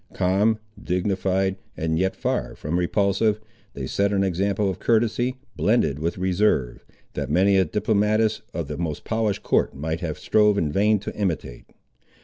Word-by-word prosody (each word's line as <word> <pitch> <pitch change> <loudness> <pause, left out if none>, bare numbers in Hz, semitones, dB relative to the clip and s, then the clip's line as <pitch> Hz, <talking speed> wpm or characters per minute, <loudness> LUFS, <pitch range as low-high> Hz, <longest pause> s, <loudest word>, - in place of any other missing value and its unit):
Calm, 100 +5 +2 0.3
dignified, 95 +1 0 0.2
and 80 0 0
yet 95 +1 0
far - - -2
from 80 +4 -2
repulsive, 100 +4 +1 0.4
they - - -4
set 100 0 0
an 100 -1 +2
example 100 +2 0
of 95 -1 -3
courtesy, 120 +3 +1 0.2
blended 80 - +1
with 85 +4 -2
reserve, 90 - +1 0.3
that - - -3
many 95 +6 +3
a 95 -1 +4
diplomatist 110 +1 +1
of - - -4
the - - -5
most 80 -4 -3
polished 110 -3 -1
court - - +1
might 80 +4 -3
have 80 -4 -4
strove 105 -1 +3
in 80 -6 0
vain 105 +6 +3
to 100 - -6
imitate. 85 - -3
95 Hz, 155 wpm, -24 LUFS, 85-105 Hz, 0.4 s, a